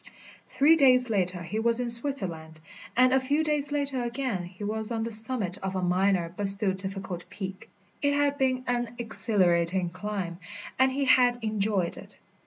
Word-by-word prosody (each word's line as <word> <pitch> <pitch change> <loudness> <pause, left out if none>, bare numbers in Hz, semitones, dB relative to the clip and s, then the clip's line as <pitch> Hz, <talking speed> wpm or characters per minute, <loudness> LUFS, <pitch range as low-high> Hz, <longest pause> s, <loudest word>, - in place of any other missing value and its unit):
Three 310 +4 +4
days 255 -4 +4
later 180 -3 +1
he 210 +6 -4
was 230 +1 +1
in 245 -1 -1
Switzerland, 185 - -4 0.4
and 255 +1 +4
a 265 - +4
few 285 +4 0
days 295 -2 -2
later 280 -3 +2
again 240 -6 -3
he 185 +3 -11
was 220 +2 -3
on 225 -1 -2
the 230 - -4
summit 215 -4 +3
of 190 0 -5
a 185 - -2
minor 180 -1 +1
but 205 +1 -1
still 195 0 +4
difficult 190 -2 -7
peak. 195 +3 -8 0.3
It 285 0 +1
had 285 0 +1
been 255 -1 0
an 240 -1 -2
exhilarating 185 -6 0
climb, 185 -2 -5 0.4
and 260 0 +4
he 275 +1 -1
had 250 -2 +4
enjoyed 205 -4 -1
it. - - +1
220 Hz, 175 wpm, -27 LUFS, 190-255 Hz, 0.4 s, Three